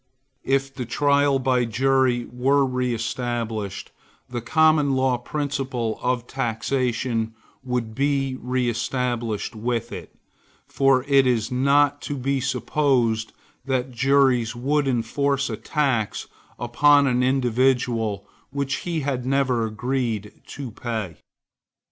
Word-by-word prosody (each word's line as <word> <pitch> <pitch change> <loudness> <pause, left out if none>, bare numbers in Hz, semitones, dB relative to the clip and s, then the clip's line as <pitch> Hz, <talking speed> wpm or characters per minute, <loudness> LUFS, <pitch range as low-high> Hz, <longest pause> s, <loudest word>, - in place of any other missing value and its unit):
If 135 0 0
the 125 -3 -5
trial 140 +2 +3
by 130 -2 +1
jury 125 +1 +2
were 135 +3 +3
reestablished, 115 -4 -3 0.4
the 120 -1 -4
Common 155 +1 +3
Law 130 -2 +1
principle 135 -5 -3
of 125 -1 0
taxation 120 -2 -1 0.3
would 125 -3 -2
be 135 0 0
reestablished 120 -2 -2
with 120 +1 -2
it; 85 -3 -8 0.6
for 135 -2 +3
it 135 -2 +4
is 120 -3 0
not 140 +3 +3
to 145 - -4
be 135 +1 0
supposed 125 -4 +1 0.3
that 130 -1 -1
juries 125 -2 +2
would 140 +4 0
enforce 135 +2 0
a - - -2
tax 130 -4 -1 0.3
upon 145 +4 +4
an 125 -2 +2
individual 125 -4 +1 0.2
which 140 0 -2
he 170 -3 -3
had 135 -3 -2
never 130 -3 +1
agreed 115 -2 -2 0.2
to 135 -5 -7
pay. 110 - -4
125 Hz, 110 wpm, -23 LUFS, 115-135 Hz, 0.6 s, it